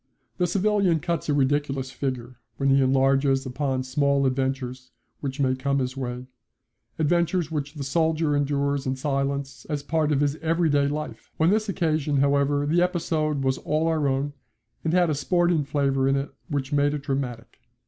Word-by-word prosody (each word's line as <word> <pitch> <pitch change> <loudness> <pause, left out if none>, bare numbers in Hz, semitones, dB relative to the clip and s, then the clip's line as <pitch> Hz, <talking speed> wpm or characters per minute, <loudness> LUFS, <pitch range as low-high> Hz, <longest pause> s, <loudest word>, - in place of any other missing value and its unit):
The 180 - +2
civilian 200 -3 +2
cuts 170 -1 -2
a - - +3
ridiculous 135 -1 0
figure 130 -2 -4 0.2
when 135 0 +1
he 135 0 +5
enlarges 135 +1 +2
upon 130 0 -2
small 140 +1 +1
adventures 130 -1 -2 0.3
which 135 0 -5
may 130 -2 +2
come 140 +1 -1
his 130 -1 -2
way 125 -1 -4 0.7
adventures 170 +1 +1
which 145 -1 -3
the 145 - -4
soldier 160 +1 +1
endures 140 -1 0
in 130 - 0
silence 140 -2 -2
as 145 -2 -2
part 155 0 0
of 145 -1 +2
his 145 +1 +1
everyday 160 -3 +2
life. 150 +1 -5
On 160 +3 +4
this 215 0 +1
occasion, 155 -6 0
however, 140 +1 +2
the 165 +4 +2
episode 155 -5 0
was 130 0 0
all 155 +1 0
our 160 -3 +1
own, 135 +2 -1 0.5
and 160 - 0
had 175 -2 +3
a - - +1
sporting 175 +2 +1
flavour 135 -1 +1
in 135 - +3
it 140 0 -3 0.2
which 145 -1 -2
made 145 0 +2
it 145 - -6
dramatic. 135 -5 -4
140 Hz, 170 wpm, -25 LUFS, 135-155 Hz, 0.7 s, he